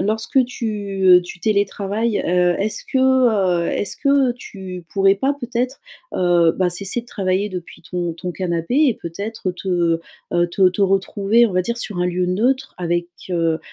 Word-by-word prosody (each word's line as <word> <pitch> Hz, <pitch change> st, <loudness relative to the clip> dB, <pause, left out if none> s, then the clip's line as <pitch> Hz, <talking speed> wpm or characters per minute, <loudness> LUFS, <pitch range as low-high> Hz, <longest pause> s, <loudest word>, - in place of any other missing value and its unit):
lorsque 220 Hz, +6 st, +1 dB
tu, 210 Hz, -5 st, -4 dB
heu, 180 Hz, -1 st, +7 dB
tu 180 Hz, -, -10 dB
télétravailles, 205 Hz, +2 st, 0 dB
heu, 180 Hz, 0 st, +3 dB
est-ce 205 Hz, +2 st, -2 dB
que, 265 Hz, -, +1 dB
heu, 220 Hz, -10 st, +3 dB
est-ce 205 Hz, -, -2 dB
que 275 Hz, -3 st, +3 dB
tu 190 Hz, -7 st, -9 dB
pourrais 195 Hz, 0 st, +4 dB
pas, 270 Hz, +8 st, 0 dB
peut-être, 250 Hz, +1 st, -3 dB, 0.3 s
heu, 175 Hz, -2 st, +3 dB
bah, 185 Hz, -1 st, +1 dB
cesser 195 Hz, +6 st, -2 dB
de -, -, -22 dB
travailler 195 Hz, 0 st, -1 dB
depuis 180 Hz, -3 st, -8 dB
ton 175 Hz, +1 st, -3 dB
ton 180 Hz, +1 st, -5 dB
canapé 170 Hz, +3 st, -2 dB
et 245 Hz, -, +2 dB
peut-être 200 Hz, +2 st, -5 dB
te, 175 Hz, -3 st, 0 dB, 0.3 s
heu, 175 Hz, 0 st, +3 dB
te 185 Hz, +1 st, +4 dB
te 185 Hz, +3 st, -1 dB
retrouver, 195 Hz, +4 st, +3 dB
on 200 Hz, -, -5 dB
va 185 Hz, 0 st, +2 dB
dire, 235 Hz, +5 st, -3 dB
sur 210 Hz, -5 st, -4 dB
un 180 Hz, -, +2 dB
lieu 180 Hz, 0 st, 0 dB
neutre 250 Hz, +9 st, 0 dB
avec, 175 Hz, 0 st, -1 dB, 0.2 s
heu, 165 Hz, -2 st, +1 dB
195 Hz, 175 wpm, -20 LUFS, 180-225 Hz, 0.3 s, heu